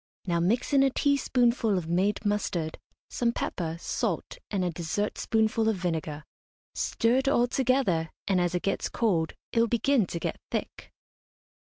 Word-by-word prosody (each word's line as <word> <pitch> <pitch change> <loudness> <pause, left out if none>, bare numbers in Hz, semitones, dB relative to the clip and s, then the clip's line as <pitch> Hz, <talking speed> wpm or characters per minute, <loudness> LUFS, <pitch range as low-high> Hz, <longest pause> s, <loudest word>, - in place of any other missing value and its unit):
Now 170 -2 +1
mix 225 - +1
in 275 - +6
a 270 - +5
teaspoonful 245 -6 +2
of 170 -3 -3
made 190 +6 0
mustard, 185 -6 -1 0.3
some 235 -1 0
pepper, 165 -7 -3
salt, - - -2
and 190 -3 0
a 175 - 0
dessertspoonful 215 +6 0
of 220 - +1
vinegar. 160 -4 -3 0.5
Stir 230 +2 +1
it 265 +1 0
all 245 -3 +4
together, 245 -11 +1 0.2
and 185 -2 +3
as 175 0 0
it 180 - -1
gets 195 - -1
cold 175 -9 0 0.2
it 230 - +1
will 230 - +4
begin 235 -1 +2
to 170 - -4
get - - -3
thick. - - -5
205 Hz, 160 wpm, -28 LUFS, 175-240 Hz, 0.5 s, in